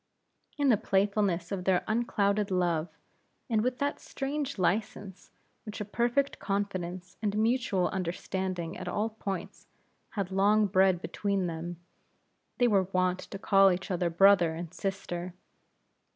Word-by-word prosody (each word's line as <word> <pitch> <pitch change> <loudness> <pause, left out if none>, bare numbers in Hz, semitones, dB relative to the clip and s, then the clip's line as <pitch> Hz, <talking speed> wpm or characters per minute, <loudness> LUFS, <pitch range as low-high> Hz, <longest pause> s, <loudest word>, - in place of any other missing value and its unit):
In 285 -2 +2
the 230 - +5
playfulness 195 -4 +1
of 185 -2 -3
their 185 -2 +3
unclouded 210 -2 +1
love, 175 -3 0 0.6
and 220 -1 +3
with 250 +2 -1
that 285 0 -1
strange 280 0 -4
license 195 0 -2 0.3
which 210 -1 -7
a 210 - -3
perfect 240 +6 0
confidence 185 -2 -3
and 210 -1 -1
mutual 220 -5 +1
understanding 185 -1 -3
at - - -7
all 215 +2 -1
points, 195 -4 -6 0.5
had 195 -2 -1
long 205 +3 +4
bred 190 -2 +3
between 200 -2 -1
them, 170 +1 -5 0.8
they 245 - +4
were 195 -5 +3
wont 185 0 +1
to 200 - -8
call 195 -1 +5
each 185 +2 -3
other 175 -1 0
brother 175 -1 +5
and 170 0 -7
sister. 185 -3 -4
195 Hz, 135 wpm, -29 LUFS, 180-215 Hz, 0.8 s, the